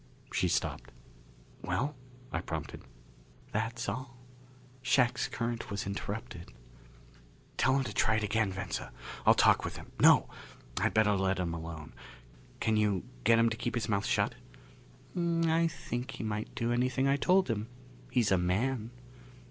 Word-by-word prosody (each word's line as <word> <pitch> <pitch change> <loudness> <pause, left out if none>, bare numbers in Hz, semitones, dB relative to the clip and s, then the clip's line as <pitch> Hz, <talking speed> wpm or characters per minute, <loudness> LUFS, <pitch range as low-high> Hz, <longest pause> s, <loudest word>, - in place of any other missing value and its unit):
She - - +2
stopped. - - -1 0.7
"Well?" 125 +12 -1 0.4
I - - -1
prompted. - - -5 0.7
"That's 115 +3 -2
all. 125 +4 -4 0.6
Shac's 125 -2 +2
current 115 -1 -3
was 100 -1 -3
interrupted." 100 -1 -5 1.1
"Tell 130 - +3
him 135 - +1
to 110 -5 -5
try 110 - +3
it 110 - 0
again, 105 -1 +1
Venza! 95 +1 -4 0.4
I'll - - +8
talk - - +5
with - - -4
him. - - -11
No! - - +7 0.5
I'd - - +1
better 110 -1 +5
let 95 -1 +1
him 90 -2 -1
alone. 80 -2 -7 0.7
Can 110 -1 +2
you 105 -4 +2 0.2
get 115 0 +6
him 115 0 +4
to 110 - -3
keep 120 +1 -2
his 120 -1 -1
mouth 100 -3 0
shut?" - - +2 0.8
"I 165 -1 +2
think 125 -5 -4
he - - -6
might 105 0 -3
do 120 -2 0
anything 130 +2 +1
I 140 - +4
told 185 +6 +3
him. 110 -2 -2 0.4
He's 115 -5 +2
a 95 - +4
man!" 110 +6 0
115 Hz, 150 wpm, -31 LUFS, 100-130 Hz, 1.1 s, I'll